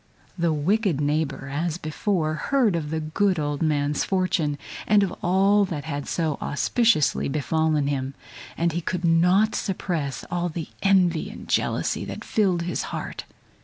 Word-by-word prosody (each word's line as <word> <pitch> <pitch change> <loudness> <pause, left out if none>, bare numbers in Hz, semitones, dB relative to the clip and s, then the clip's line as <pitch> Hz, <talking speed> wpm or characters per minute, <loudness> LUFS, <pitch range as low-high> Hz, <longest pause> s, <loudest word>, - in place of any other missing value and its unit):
The 170 -2 +1
wicked 175 +2 +1
neighbor, 145 -2 -1
as 165 +2 -1
before, 155 0 -1
heard 230 - +1
of 155 -3 -2
the 160 +1 -1
good 180 +5 +1
old 145 -2 -2
man's 145 -2 +1
fortune, 185 -6 0 0.3
and 210 -1 +5
of 190 - -1
all 195 +3 +4
that 160 -6 -4
had 145 -2 -4
so 160 -4 -1
auspiciously 220 - +2
befallen 155 +1 +1
him, 135 -1 -2 0.4
and 170 0 +1
he 170 +2 -2
could 180 +1 -2
not 180 +6 +4
suppress 170 -8 -2
all 175 0 0
the 160 -1 -5
envy 180 -5 +3
and - - -10
jealousy - - 0
that - - -7
filled 185 -6 +1
his 175 0 -2
heart. - - -5
165 Hz, 155 wpm, -24 LUFS, 150-185 Hz, 0.4 s, and